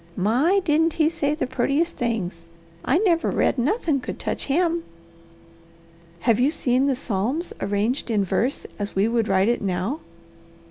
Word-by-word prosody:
My, 260 - +3
didn't 320 0 +2
he 315 0 +2
say 295 -3 -1
the 320 - -1
purtiest 275 +6 0
things! 180 -8 -3 0.3
I 270 - +2
never 350 -4 +2
read - - +1
nothin' 305 - +1
could - - -6
touch - - -3
him!" 335 +3 +1 1.4
"Have 230 +1 +2
you 260 +3 +4
seen 265 -3 +1
the 270 - +2
Psalms 250 - -2
arranged 210 +7 -1
in 210 -3 +2
verse 245 +8 -1
as 205 0 -4
we 195 +3 +3
would 230 -1 +1
write 190 +1 +3
it 240 +1 +1
now?" 195 - -2
255 Hz, 155 wpm, -23 LUFS, 210-315 Hz, 1.4 s, you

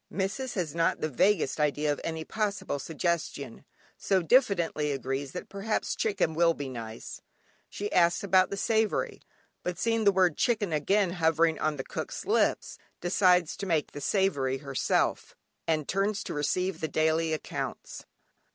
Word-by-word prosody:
Missis 210 +7 -3
has 175 -6 -2
not 165 0 +1
the 155 - -1
vaguest 160 +2 +2
idea 150 0 +1
of - - -8
any 160 -1 -4
possible 205 -9 -2
suggestion, 170 +3 -3 0.3
so 190 -3 +1
diffidently 170 - +2
agrees 135 +1 -3
that 180 - -6
perhaps 200 +2 -2
chicken 190 -7 0
will 165 +1 +3
be 140 -2 -5
nice. 115 -3 -7 0.5
She 205 +1 -5
asks 170 +1 +3
about 185 -1 +4
the 200 - -4
savoury, 220 +1 0 0.4
but 180 -1 -3
seeing 225 +2 +1
the 200 - +6
word 185 -4 +2
"chicken" 210 -8 +1
again 185 +5 +2
hovering 165 -2 +2
on 155 -1 0
cook's 135 - -5
lips, - - +1 0.2
decides 180 -1 +3
to 200 - -4
make 160 -4 0
the 145 - -8
savoury 140 -9 +1
herself, 135 -1 -1 0.3
and 155 -3 0
turns 195 +2 0
to - - -5
receive 180 +6 -1
the 160 - 0
daily 160 +1 +1
accounts. 155 - -5
170 Hz, 150 wpm, -28 LUFS, 150-195 Hz, 0.5 s, the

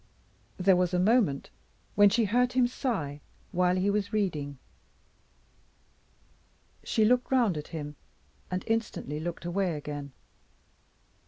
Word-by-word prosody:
There 185 0 +4
was 180 0 +1
a - - +2
moment 195 - +2 0.4
when 205 0 +6
she 225 +3 +2
heard 245 +4 +2
him 255 -1 +4
sigh 195 - -3 0.3
while 180 -1 +2
he 190 +2 +1
was 205 0 -1
reading. 155 -10 -1 2.3
She 220 - +2
looked 250 +3 +2
round 240 -9 +3
at 150 -1 -5
him, 150 -3 -6 0.5
and 185 0 -2
instantly 225 -10 -2
looked 170 +1 -5
away 175 -1 0
again. 145 -2 -6
185 Hz, 120 wpm, -29 LUFS, 155-220 Hz, 2.3 s, when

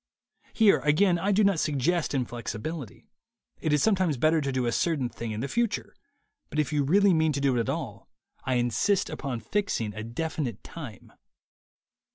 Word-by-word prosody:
Here 215 -3 +5
again 175 +4 +3
I 200 +4 +1
do 210 +2 +4
not 195 -5 +3
suggest 150 +3 0
inflexibility. 120 +2 -5 0.5
It 155 - -1
is 150 -1 +3
sometimes 185 -9 +2
better 155 +5 +3
to 140 -1 -1
do 130 -1 0
a 120 - +1
certain 145 -3 0
thing 115 -1 -6
in 110 0 -3
the 135 - -2
future; 235 +4 -1 0.6
but - - -6
if 150 0 0
you 145 -1 +2
really 195 +6 +4
mean 160 -1 +2
to 140 - -2
do 140 -2 +2
it - - +1
at 115 - -1
all, - - -5 0.3
I 130 - 0
insist 120 - +1
upon 130 -5 -4
fixing 115 - -1
a 110 +2 -6
definite 125 -1 -4
time. 135 - -10
150 Hz, 180 wpm, -27 LUFS, 120-175 Hz, 0.6 s, Here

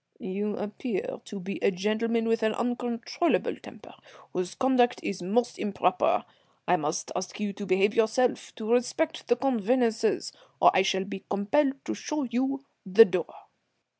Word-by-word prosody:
"You 205 -2 -3
appear 380 - -4
to 205 - -7
be 195 +2 -5
a - - +4
gentleman 220 +4 0
with 225 0 +1
an 220 0 +2
uncontrollable 240 +6 -1
temper, - - -13 0.4
whose 185 0 -3
conduct 255 -2 +3
is 190 -2 -3
most 225 +7 0
improper. 205 - +1 0.4
I 180 - +5
must 155 -2 -2
ask 185 +2 -4
you 205 -1 -2
to 200 0 -7
behave 195 +3 +3
yourself, 230 +3 +1
to 220 -1 -4
respect 250 +6 0
the 240 - +4
convenances, 240 -2 +1 0.3
or - - +7
I 185 - +4
shall 190 0 +1
be 195 -1 -7
compelled 265 +8 +1
to - - -2
show 300 -1 -3
you 265 +3 -1 0.2
the 200 +4 +8
door." 180 -4 -2
225 Hz, 155 wpm, -27 LUFS, 195-245 Hz, 0.4 s, the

